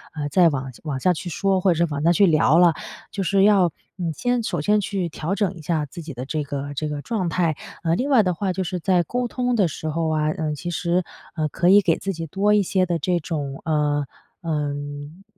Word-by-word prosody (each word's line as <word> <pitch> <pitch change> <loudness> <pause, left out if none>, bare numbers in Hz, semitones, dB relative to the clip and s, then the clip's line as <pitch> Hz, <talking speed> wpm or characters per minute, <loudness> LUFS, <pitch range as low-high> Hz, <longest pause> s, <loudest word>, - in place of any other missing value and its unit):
呃， 150 -2 -2
再 170 +3 +5
往 135 -2 -4
往 140 -4 -3
下 180 +6 +3
去 175 +2 -6
说， 190 +2 +1
或 185 - +4
者 - - +2
是 155 - -5
往 145 - -2
下 170 +3 +4
去 200 +4 +5
聊 160 -1 +4
了。 175 -2 +6 0.4
就 200 - -3
是 195 +1 +2
要 195 -5 +5 0.3
你 170 -3 -2
先 245 - 0
首 175 -7 -2
先 210 +7 +2
去 190 -3 -2
调 165 +4 -3
整 200 -3 0
一 170 - -11
下 155 -1 -1
自 170 +5 -9
己 155 -3 -8
的 125 +2 -5
这 150 +2 -2
个 145 0 -5
这 150 +2 -3
个 145 -1 -5
状 200 -7 -1
态， 165 -2 +1 0.3
呃 165 0 +2
另 265 +8 -1
外 245 -6 +5
的 180 -1 +1
话 190 +2 -2
就 190 +1 -2
是 180 +1 -3
在 180 +1 +2
沟 245 +8 -2
通 250 0 -1
的 200 -6 +3
时 160 0 -6
候 160 +1 -1
啊， 155 -1 +1
嗯 155 -3 -2
其 175 +4 -5
实， 175 +2 0 0.3
呃， 155 -2 0
可 175 +5 +1
以 205 +1 +7
给 170 -4 +2
自 195 - -2
己 165 -2 -5
多 200 +6 +2
一 205 - +3
些 185 -1 +1
的 170 -1 0
这 175 0 0
种， 145 -4 -4
呃， 150 -2 +1 0.4
嗯， 145 +2 -4
170 Hz, 260 characters per minute, -23 LUFS, 150-190 Hz, 0.4 s, 以